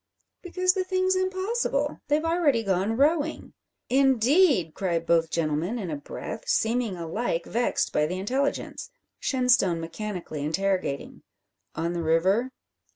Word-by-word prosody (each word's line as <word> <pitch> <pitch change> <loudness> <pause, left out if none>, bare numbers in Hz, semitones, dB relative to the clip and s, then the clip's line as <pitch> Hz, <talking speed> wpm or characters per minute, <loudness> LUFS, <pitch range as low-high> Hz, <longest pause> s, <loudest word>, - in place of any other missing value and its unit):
"Because 365 +1 +1
the 375 - -1
thing's 370 0 +1
impossible; 375 -5 -1
they've 300 +2 +1
already 325 -8 +2
gone 195 +3 0
rowing." 305 +2 +1 0.3
"Indeed!" 265 - +3
cry 180 -3 -1
both 165 0 +1
gentlemen 165 +7 -1
in 190 -7 -4
a - - -2
breath, 145 +8 -7
seeming 225 -3 +1
alike 170 +1 -2
vexed 240 +2 0
by 150 0 +2
the 180 +3 -3
intelligence, 265 - -2 0.3
Shenstone 250 -10 +2
mechanically 170 -3 -5
interrogating: 185 -2 -2 0.5
"On 165 +2 -2
the 170 - -2
river?" 185 +10 +2
225 Hz, 125 wpm, -26 LUFS, -, 0.5 s, Indeed